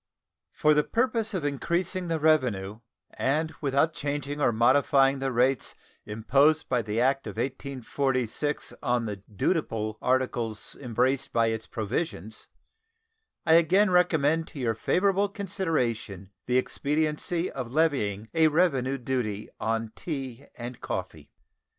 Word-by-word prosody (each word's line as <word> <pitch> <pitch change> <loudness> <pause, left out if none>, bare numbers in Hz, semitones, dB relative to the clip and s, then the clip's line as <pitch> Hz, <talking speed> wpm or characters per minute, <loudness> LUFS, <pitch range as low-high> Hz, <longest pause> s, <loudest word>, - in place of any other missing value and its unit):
For 155 0 +3
the 150 0 +3
purpose 230 - 0
of 165 -6 -2
increasing 170 +5 -1
the 165 -1 -1
revenue, 120 -10 +1 0.3
and 155 +4 0
without 145 +3 +2
changing 145 0 -3
or 120 - +4
modifying 135 +4 +4
the 135 0 -1
rates 125 +1 +1 0.3
imposed 140 +9 +2
by 125 -2 +1
the 110 0 -2
act 135 0 +1
of 100 - -7
1846 135 +1 -2
on 120 -3 0
the 105 -2 -4
dutiable 110 - -2
articles 120 -4 -1
embraced 130 +2 0
by 115 -1 +2
its 110 0 -4
provisions, 110 - -4 1.0
I 160 - +5
again 185 +5 +5
recommend 165 -3 +3
to 145 - -10
your 115 -3 +1
favorable 195 - +1
consideration 125 - -2 0.2
the 125 +1 +2
expediency 155 +6 -1
of 125 -3 -5
levying 125 -9 +1
a 160 -1 +5
revenue 140 -5 +2
duty 120 -5 -3
on 115 0 -1
tea 135 -5 -6
and 120 +1 -7
coffee. 80 -5 -5
135 Hz, 125 wpm, -27 LUFS, 115-160 Hz, 1.0 s, I